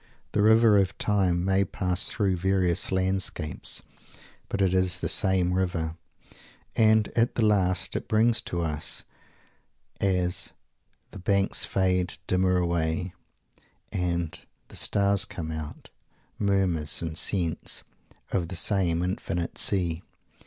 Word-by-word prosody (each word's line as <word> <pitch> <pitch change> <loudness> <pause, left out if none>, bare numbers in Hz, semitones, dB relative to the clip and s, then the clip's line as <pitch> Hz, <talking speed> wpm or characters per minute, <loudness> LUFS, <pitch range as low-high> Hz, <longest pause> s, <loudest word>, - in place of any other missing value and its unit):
The 105 - +1
"river 110 -1 +6
of 95 -1 0
time" 90 -4 +1
may 95 +1 +3
pass 90 -1 +1
through 100 -4 0
various 95 -1 +1
landscapes, 95 -5 -1 0.7
but 100 - -3
it 95 -2 +2
is 95 -1 +2
the - - -3
same 95 -3 +3
river, 85 -3 -1 0.8
and, 110 -1 +4
at 115 +1 +1
the 115 - +2
last, 95 -4 +1
it - - -3
brings 110 +1 +3
to 85 -5 -3
us, 80 -1 -3 1.0
as 90 -2 0 0.6
"the - - -9
banks 100 +1 +1
fade 90 -2 0
dimmer 90 0 +2
away" 85 0 -1 0.8
and 85 -2 -2 0.3
"the - - -11
stars 100 -1 +3
come 80 -3 -6
out" 80 -1 -7 0.5
"murmurs 95 -7 +1
and 80 -1 -4
scents" 85 -2 0 0.5
of 90 -3 0
the 95 - -6
same 90 -2 0
infinite 90 -2 -3
Sea. 85 -4 0
95 Hz, 125 wpm, -27 LUFS, 85-100 Hz, 1.0 s, river